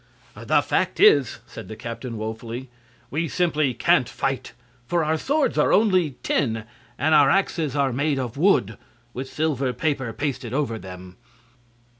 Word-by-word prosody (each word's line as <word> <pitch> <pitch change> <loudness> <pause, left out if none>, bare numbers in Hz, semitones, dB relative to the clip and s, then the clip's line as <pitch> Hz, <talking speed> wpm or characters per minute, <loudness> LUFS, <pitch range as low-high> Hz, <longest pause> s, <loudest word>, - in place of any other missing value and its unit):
"The - - +1
fact - - -1
is," 140 -6 +5
said - - -10
the 110 - -7
captain, 115 +1 -6
woefully, 115 +3 -6 0.4
"we 165 +4 -1
simply 155 -6 0
can't - - +3
fight. - - -3 0.3
For 170 -1 +1
our 155 +1 +1
swords 285 - 0
are - - +3
only 185 - +3
tin, 115 -6 0 0.3
and 155 +4 +2
our 145 -2 +6
axes 165 -6 0
are 140 -3 +1
made 140 +2 0
of 125 -3 -3
wood, 140 - +2 0.3
with 130 +2 -5
silver 140 -5 -1
paper 140 -6 -1
pasted 125 0 -3
over 130 -6 -1
them." 90 -1 -11
135 Hz, 150 wpm, -23 LUFS, 115-155 Hz, 0.4 s, our